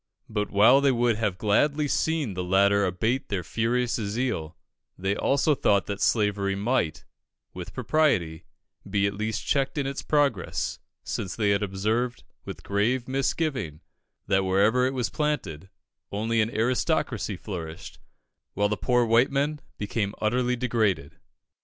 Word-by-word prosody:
But 105 -2 -2
while 110 +7 +6
they 140 -1 +4
would 120 -3 +1 0.2
gladly 145 +10 +2
have 145 - -1
seen 160 -9 0
the 90 0 -3
latter 100 +2 +3
abate 110 +9 -1
their 95 -3 -2
furious 120 +6 0
zeal, 105 -7 -3 0.4
they 95 +2 -1
also 140 +6 +2
thought 100 -7 +2
that 100 -1 -5
slavery 100 -3 +1
might, 100 -7 -1 0.5
with - - -8
propriety, 90 - +1 0.4
be 100 0 +1
at 100 - 0
least 110 +1 -3
checked 135 0 0
in 140 - 0
its 135 +1 -3
progress, 140 -10 0 0.2
since 95 - -4
they 105 -3 +1
had 100 0 +2
observed, 110 +5 -1 0.2
with - - -8
grave 115 +5 0
misgiving, 135 - -1 0.4
that 95 0 +2
wherever 105 +7 +3
it 135 - -3
was 125 -3 -1
planted, 95 - -2 0.4
only 110 +2 0
an 110 - +1
aristocracy 120 - 0
flourished, 85 -5 -7 0.6
while 105 0 +2
the 105 - -1
poor 125 +1 +2
white 115 +3 +4
men 145 +2 -1 0.2
became 105 0 -2
utterly 125 +3 +1
degraded. 110 - -1
110 Hz, 145 wpm, -26 LUFS, 100-130 Hz, 0.6 s, while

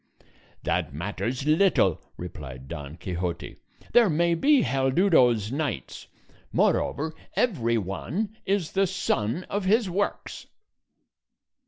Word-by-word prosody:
"That - - -1
matters 115 - -3
little," 155 - +3 0.2
replied 65 -7 -8
Don 75 +2 -7
Quixote; 90 -1 -4 0.4
"there 235 -4 +6
may 170 +2 +2
be 275 - +4
Haldudos 130 - +3
knights; 135 - -4 0.4
moreover, 155 +2 +1 0.2
every 120 - +1
one 145 - -3
is 195 -4 0
the 195 0 +2
son 175 - -1
of 200 +1 -3
his 210 0 +3
works." 200 +3 -3
145 Hz, 105 wpm, -26 LUFS, -, 0.4 s, there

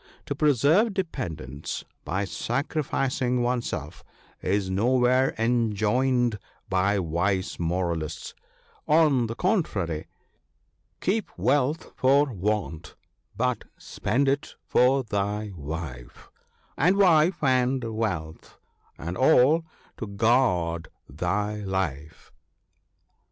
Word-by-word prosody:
To - - -2
preserve 150 - +3
dependants 80 - -4 0.2
by 100 +2 -1
sacrificing 130 +1 -1
oneself 120 - -3 0.4
is 100 +1 0
nowhere 125 +6 +2
enjoined 115 +1 +1 0.3
by 95 +2 +2
wise 95 +3 -1
moralists; 85 -2 -2 0.5
on 150 -6 +4
the 115 - -5
contrary, 105 - -1 0.3
— - - -46
" - - -46
Keep 205 +3 0
wealth 145 +3 +1
for 135 +1 +3
want, 95 -4 -3 0.4
but 125 +1 0
spend 140 +3 -1
it 140 +2 -1
for 130 +2 +3
thy 105 -1 -2
wife, 75 -5 -7 0.4
And 180 +7 +3
wife, 170 -3 +4
and 130 -1 +2
wealth, 90 -8 -4 0.4
and 85 +2 -5
all 150 - +4 0.3
to 110 - -5
guard 100 -7 +1 0.2
thy 100 +9 -2
life." 95 -7 -4
115 Hz, 95 wpm, -26 LUFS, 90-135 Hz, 0.5 s, on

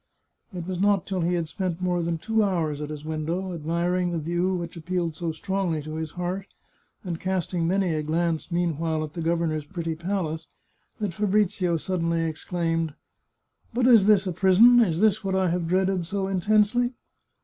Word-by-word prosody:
It 180 -3 -6
was 185 -2 -3
not 200 -2 +3
till 190 -2 -2
he 175 +2 +1
had 170 -2 -1
spent 180 0 -3
more 180 -1 0
than 170 0 -1
two 220 +7 0
hours 165 -7 0
at 150 - -4
his 150 -1 -7
window, 165 +4 -3
admiring 170 +3 0
the 170 - -2
view 175 +4 0
which 170 -1 -5
appealed 170 0 -2
so 165 +1 -3
strongly 185 -1 -2
to 155 +1 -7
his 160 0 -3
heart, 180 +2 -3 0.6
and 170 -3 -4
cast 185 -2 -2
ing 170 -2 +1
many 185 -1 +1
a 155 - 0
glance, 165 +2 -1
meanwhile, 165 -2 0
at 150 -1 -7
the 170 - -4
governor's 165 -2 0
pretty 165 0 -4
palace, 165 -2 -3 0.5
that 205 -5 -2
Fabrizio 190 -3 +1
suddenly 170 -1 -1
exclaimed: 165 -1 -2 0.4
" - - -42
But 245 0 +2
is 230 -6 +6
this 210 -2 +5
a 185 - -1
prison? 200 +7 +6
Is 180 -7 +2
this 215 -1 +3
what 190 -1 -1
I 190 -1 +2
have 175 -1 -1
dreaded 185 -1 +1
so 195 +1 -2
intensely 215 +6 +2
175 Hz, 185 wpm, -25 LUFS, 165-190 Hz, 0.6 s, is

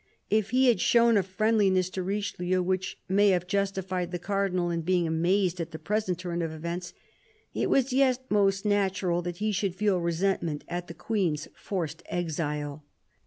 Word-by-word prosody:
If 215 -1 +2
he 255 +2 +3
had 240 - +4
shown 235 -1 +5
a 200 - +5
friendliness 190 -1 +2
to 185 - -3
Richelieu 185 -2 -1
which 185 +1 -2
may 200 +2 +4
have 180 -2 +2
justified 190 -2 -1
the 180 - -3
Cardinal 185 -1 -1
in 170 -1 -1
being 175 +1 +1
amazed 175 +3 +1
at 165 - -4
the 160 - -7
present 210 -1 -1
turn 175 -1 -3
of 165 -1 -2
events, 170 +2 -5 0.6
it - - -1
was 265 -1 +2
yet 260 -1 +2
most 195 -1 +2
natural 190 -4 +1
that 175 0 -5
he 215 +2 0
should 195 -2 -1
feel 200 -1 +1
resentment 170 -2 -1
at 175 +1 -4
the 170 - -9
Queen's 170 -6 -1
forced 175 -6 -4
exile. 150 -3 -3
185 Hz, 170 wpm, -28 LUFS, 175-205 Hz, 0.6 s, shown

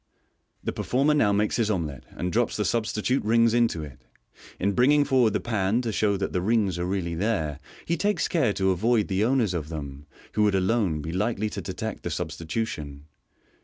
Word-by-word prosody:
The - - -2
performer 140 +4 +1
now 110 -9 +3
makes 105 +1 +1
his 115 -3 +1
omelet, 80 -9 -3
and 90 +2 -4
drops 120 +1 +1
the 105 - 0
substitute 115 +2 0
rings 115 +1 +3
into 115 -9 +2
it. 75 -2 -11 0.6
In 100 - +1
bringing 145 +7 +4
forward 125 -6 +3
the - - +1
pan 110 +1 0
to 115 - -1
show 100 -1 +1
that 95 - -3
the 90 - 0
rings 100 -3 +1
are 90 - -1
really 90 -3 -2
there, 80 -6 -1 0.3
he 170 - 0
takes 205 +5 +1
care 140 -11 +2
to 95 -1 +1
avoid 110 +4 +1
the 95 +1 +1
owners 120 -5 +2
of 80 -3 -3
them, 70 -2 -7 0.2
who 105 - 0
would 105 -2 +3
alone 95 -5 +1
be 80 - -4
likely 105 +3 -1
to - - -4
detect - - -5
the - - -4
substitution. 75 -6 -4
105 Hz, 195 wpm, -26 LUFS, 85-115 Hz, 0.6 s, bringing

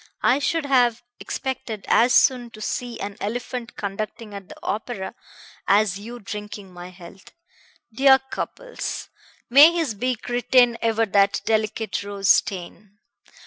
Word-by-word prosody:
I 260 +3 +4
should 315 +2 -1
have 245 -4 +2 0.2
expected 230 -5 -5
as 245 +2 +4
soon 245 -2 +3
to - - -11
see 240 +1 -4
an 200 0 -6
elephant 235 +2 -4
conducting 210 +2 -5
at 200 -2 -9
the - - -10
opera 210 -3 -4 0.5
as 200 -1 +3
you 235 +4 -8
drinking 205 -2 -8
my 175 0 -9
health. 185 +1 -14 0.6
Dear 265 +3 +6
Cupples! - - -5 0.4
May 285 +6 +8
his 325 -9 -1
beak 245 +2 -3
retain 245 0 +3
ever 225 0 +1
that 200 -1 +2
delicate 220 -1 -1
rose 200 -1 -3
stain! 195 +2 0
220 Hz, 135 wpm, -23 LUFS, 200-245 Hz, 0.6 s, May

